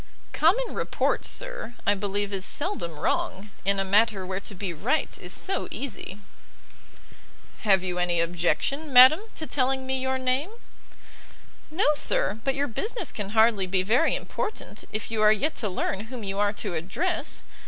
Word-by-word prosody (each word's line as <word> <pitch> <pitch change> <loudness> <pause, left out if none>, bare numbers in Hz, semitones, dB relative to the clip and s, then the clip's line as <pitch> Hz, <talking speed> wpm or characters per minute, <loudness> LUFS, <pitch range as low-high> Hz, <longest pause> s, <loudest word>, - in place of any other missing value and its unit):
"Common 425 +11 +2
report, - - -1
sir, - - -3
I 205 - +4
believe 205 0 -2
is 190 -1 -1
seldom 195 - 0
wrong 195 +6 -2
in 200 0 +2
a 195 - 0
matter 205 0 +2
where 185 +1 -3
to 200 0 -2
be 185 -1 -4
right 235 - -1
is - - -5
so 385 - 0
easy." 235 -7 -6 1.4
"Have 195 -4 +3
you 180 -1 -2
any 175 -1 +1
objection, 175 - 0
madam, 260 +5 +9 0.2
to 315 - -3
telling 265 -2 0
me 265 0 -1
your 260 0 0
name?" 260 +6 0 1.2
"No, 320 +6 0
sir; 215 -7 +1
but 270 -1 0
your 285 +1 0
business 430 - -3
can 205 -2 -4
hardly 220 -4 +4
be 185 0 +1
very 240 - +2
important, 430 - -4
if 215 +1 -4
you 220 -1 -1
are 215 0 +6
yet 280 +9 +1
to 210 - -1
learn 195 +2 -2
whom 240 -1 -8
you 195 0 -3
are 205 0 +2
to 205 -3 -3
address. 195 - -2
215 Hz, 165 wpm, -26 LUFS, 195-275 Hz, 1.4 s, madam